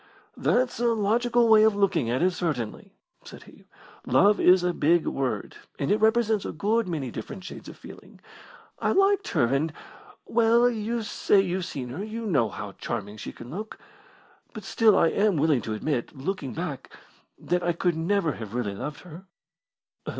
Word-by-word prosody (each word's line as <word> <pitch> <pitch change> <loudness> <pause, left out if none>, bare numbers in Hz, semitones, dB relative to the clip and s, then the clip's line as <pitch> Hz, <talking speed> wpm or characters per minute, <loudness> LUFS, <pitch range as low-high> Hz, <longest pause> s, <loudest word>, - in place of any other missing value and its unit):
"That's 250 -1 0
a 240 - +2
logical 235 +3 +2
way 220 -1 +7
of 220 -1 +4
looking 190 - +1
at 125 +7 0
it, 185 - +3
certainly," 145 - -4 0.3
said - - -12
he. - - -18 0.4
"Love 195 +12 +4
is 180 0 +5
a 180 0 +1
big 165 +2 +2
word, 125 -6 -3 0.2
and 140 - -1
it 210 - +2
represents 220 -2 +2
a - - -4
good 225 +1 0
many 145 -8 -3
different 185 - -8
shades 185 - -9
of - - -12
feeling. - - -14 0.6
I - - +1
liked 390 +1 +3
her, - - +2
and 135 +6 0 0.5
well, 235 +1 +3
you 230 0 -2
say 205 -1 +2
you've 185 -1 -1
seen 130 -7 -6
her 150 +11 -5
you 225 +2 -6
know 135 - +1
how 100 0 -7
charming 105 -2 -5
she - - -7
can 120 - -11
look. 210 +6 -7 0.8
But - - -8
still 225 -3 +3
I 165 - +4
am 200 -2 +1
willing 150 -4 +2
to 110 - -4
admit, 130 +2 -3
looking 140 -2 -4
back, 160 -5 -5 0.5
that 180 +1 -1
I 175 - +1
could 170 0 0
never 170 0 0
have 115 -3 -8
really 115 -5 -2
loved 145 +9 -6
her." 180 +1 -12
180 Hz, 180 wpm, -26 LUFS, 135-215 Hz, 0.8 s, way